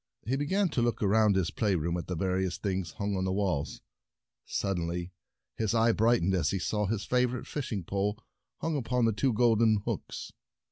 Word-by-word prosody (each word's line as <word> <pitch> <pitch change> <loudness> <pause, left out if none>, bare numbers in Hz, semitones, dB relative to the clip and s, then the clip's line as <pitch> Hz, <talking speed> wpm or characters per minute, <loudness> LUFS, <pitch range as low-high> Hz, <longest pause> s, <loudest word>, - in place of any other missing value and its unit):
He 125 +5 0
began 185 +8 +1
to 130 - 0
look 120 -2 0
around 105 0 +4
his 95 -3 +1
play 105 -4 +1
room, 85 +1 -1
at 85 - -4
the 90 - -2
various 95 +1 0
things 95 -5 -2
hung 100 -1 -2
on 95 - -1
the 95 - 0
walls. 95 -7 -1 0.7
Suddenly 90 -2 -2 0.5
his 110 0 0
eye 115 +1 +4
brightened 110 -4 +3
as 85 -6 +2
he 100 - 0
saw 105 +2 -1
his 105 0 -2
favor 125 0 +1
ite - - -8
fishing 115 -10 -3
pole 100 +4 -1 0.4
hung 165 -1 -1
upon 125 -3 +1
two 130 +6 +1
golden 110 -2 +3
hooks. - - -4
105 Hz, 185 wpm, -30 LUFS, 95-115 Hz, 0.7 s, around